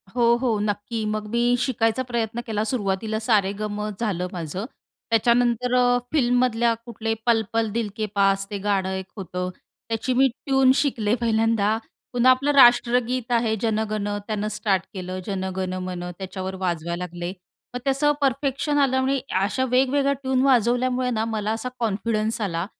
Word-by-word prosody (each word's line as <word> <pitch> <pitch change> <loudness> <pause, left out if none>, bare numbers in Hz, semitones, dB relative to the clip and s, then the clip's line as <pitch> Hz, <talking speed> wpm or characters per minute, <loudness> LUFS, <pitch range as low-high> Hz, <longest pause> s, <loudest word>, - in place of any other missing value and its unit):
हो, 235 -1 +4
हो 230 -5 +1
नक्की. 210 +2 -2
मग 215 0 -2
मी 235 0 +1 0.2
शिकायचा 240 -1 +1
प्रयत्न 235 -2 -2
केला. 215 -1 -1
सुरुवातीला 215 -2 -1
सा-रे-ग-मं 210 -1 0
झालं 190 -6 -1
माझं. 175 +3 -4 0.4
त्याच्यानंतर 240 +2 +2
अ, 245 0 +4
फिल्ममधल्या 245 -4 +2
कुठले 225 -2 -3
पल 230 -2 +3
पल 225 -1 +1
दिल 225 0 -1
के 215 - -1
पास 195 0 +3
ते 205 - -3
गाणं 195 -1 0
एक 190 0 -4
होतं. 180 -1 -4 0.4
त्याची 230 +3 -1
मी 270 - +6 0.2
ट्यून 270 -2 +4
शिकले 240 -7 +1
पहिल्यांदा. 225 -2 +2 0.4
पुन्हा 245 +1 +5
आपलं 270 +3 +2
राष्ट्रगीत 245 -1 +4
आहे 230 -2 +2
जन 220 -2 +1
गण 210 -1 -2 0.2
त्यानं 215 -1 -2
स्टार्ट 195 -5 0
केलं. 185 -1 -5
जन 195 -2 -3
गण 185 -1 -2
मन 180 -1 -5
त्याच्यावर 190 0 -5
वाजवायला 170 0 -2
लागले. 175 0 -5 0.4
मग 245 - -3
ते - - +2
असं 285 +2 +3
परफेक्शन 275 +2 0
आल्यामुळे 265 0 +2 0.2
अशा 210 +6 0
वेगवेगळ्या 275 +2 +3
ट्यून 265 -1 -1
वाजवल्यामुळे 250 0 +2
ना 220 -1 0
मला 215 -1 -2
असा 225 +3 -3
कॉन्फिडन्स 220 0 -1
आला 170 -4 -1
225 Hz, 155 wpm, -24 LUFS, 205-250 Hz, 0.4 s, मी